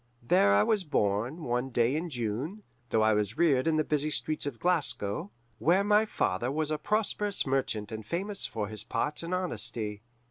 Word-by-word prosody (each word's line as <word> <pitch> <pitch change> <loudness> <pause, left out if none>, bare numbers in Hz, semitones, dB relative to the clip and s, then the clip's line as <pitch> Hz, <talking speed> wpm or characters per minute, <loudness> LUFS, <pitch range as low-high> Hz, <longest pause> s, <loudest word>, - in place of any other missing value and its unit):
There 120 - +4
I 100 - +5
was 205 - +1
born 120 - -1
one 125 +1 -1
day 120 +1 +1
in 170 +3 -2
June, 130 - -3 0.3
though 110 - +2
I 110 0 +4
was 105 +3 -1
reared 155 -4 +3
in 160 - +2
the 155 - +2
busy 150 0 0
streets 150 +2 -2
of 135 -5 -5
Glasgow, 140 - +2 0.3
where 180 +5 +3
my 210 +1 +3
father 120 - -1
was 155 +1 -2
a 155 - -1
prosperous 210 -1 0
merchant 130 -6 -1
and 110 0 -6
famous 195 - -2
for 105 -2 -4
his 105 0 -6
parts 130 +7 -2
and 170 +1 -6
honesty. 115 - -2
135 Hz, 185 wpm, -29 LUFS, 110-170 Hz, 0.3 s, I